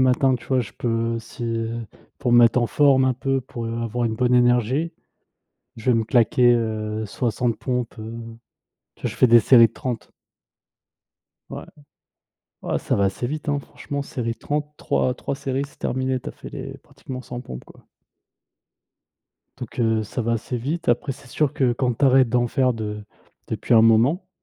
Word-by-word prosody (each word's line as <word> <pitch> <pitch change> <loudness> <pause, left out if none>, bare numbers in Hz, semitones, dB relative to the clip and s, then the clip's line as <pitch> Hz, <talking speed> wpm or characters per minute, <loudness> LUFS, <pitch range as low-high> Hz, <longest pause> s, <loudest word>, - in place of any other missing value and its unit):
matin, 130 +1 +3
tu 125 - -7
vois? 130 -1 +2
Je 105 -4 -6
peux, 115 -1 -1
si 115 -1 -4 0.5
pour 125 -3 0
me 120 - +7
mettre 120 +1 +6
en 120 - +2
forme 135 0 +4
un 130 - +3
peu, 135 +1 -1
pour 120 -1 -6
avoir 115 +1 -2
une 110 - -2
bonne 125 +1 +2
énergie, 125 +6 +2 0.8
je 115 +3 0
vais - - +4
me 110 - 0
claquer, 120 +1 +4
heu, 110 -1 -2
60 115 +2 -1
pompes, 125 -2 -2
heu 110 +1 -7 0.9
tu - - -24
vois? - - -1
Je - - -9
fais - - +5
des 120 0 +8
séries 115 -1 +7
de - - -26
30. 120 -1 -5 1.4
Ouais. - - -6 1.0
Ouais - - -1
ça - - -1
va 100 - +2
assez 100 +5 -2
vite, 150 +3 -5
hein, 145 - +1
franchement 140 +1 -6
série 120 -4 -3
de - - -23
30-3-3 145 -3 -2
séries, 135 0 -2
c'est - - -23
terminé. 130 0 -1
Tu - - -7
as - - -7
fait - - -10
les - - -7
pratiquement 130 -1 -9
100 125 -1 -7
pompes, 65 - -9
quoi. - - -18 1.7
Donc 125 -1 -9
heu, 110 -1 +2
ça 115 +4 -4
va 115 +1 0
assez 115 +2 -2
vite, 155 +8 -3
après 120 +4 +1
c'est - - -15
sûr 140 +3 0
que 130 -3 +2
quand 125 0 0
tu 140 - 0
arrêtes 130 -1 +5
d'en 120 +1 +2
faire 130 +1 +1
de 105 -2 -5 0.4
depuis - - 0
un 110 - +7
moment, 120 - +3
120 Hz, 185 wpm, -23 LUFS, 115-130 Hz, 1.7 s, des